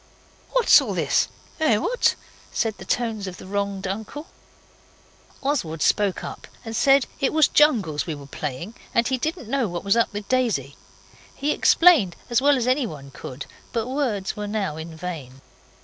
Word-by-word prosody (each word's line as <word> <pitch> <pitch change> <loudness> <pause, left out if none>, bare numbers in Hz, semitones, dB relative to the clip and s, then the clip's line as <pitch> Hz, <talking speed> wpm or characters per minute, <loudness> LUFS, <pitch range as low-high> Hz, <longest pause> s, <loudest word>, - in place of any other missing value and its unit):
'What's - - +6
all - - -3
this - - +2 0.3
eh, 270 -9 +3
what?' 485 - +1 0.4
said 220 -3 -1
the - - -9
tones 225 -4 -1
of 180 - -7
the - - -11
wronged 200 0 -2
uncle. 220 +10 -5 1.2
Oswald 175 - -1
spoke 205 -3 +2
up - - -8 0.2
and 225 0 -5
said 270 +1 +4
it 275 - +1
was 315 -1 +5
jungles 210 - +3
we 160 - -3
were 145 -1 -10
playing, 150 - -5 0.2
and 235 0 +3
he 260 -1 0
didn't 315 - -3
know 260 -1 0
what 175 -2 -5
was 200 +1 +3
up 230 - +2
with 205 -1 -6
Daisy. 220 - 0 0.6
He 290 +2 0
explained 300 - +5 0.2
as 240 +1 +3
well 285 0 +4
as 240 - -1
anyone 225 - -1
could, 135 0 -8 0.3
but 230 -2 -1
words 250 -8 -1
were 210 0 -4
now 205 -7 -2
in 160 +1 -8
vain. 155 -7 -7
215 Hz, 170 wpm, -24 LUFS, 175-260 Hz, 1.2 s, What's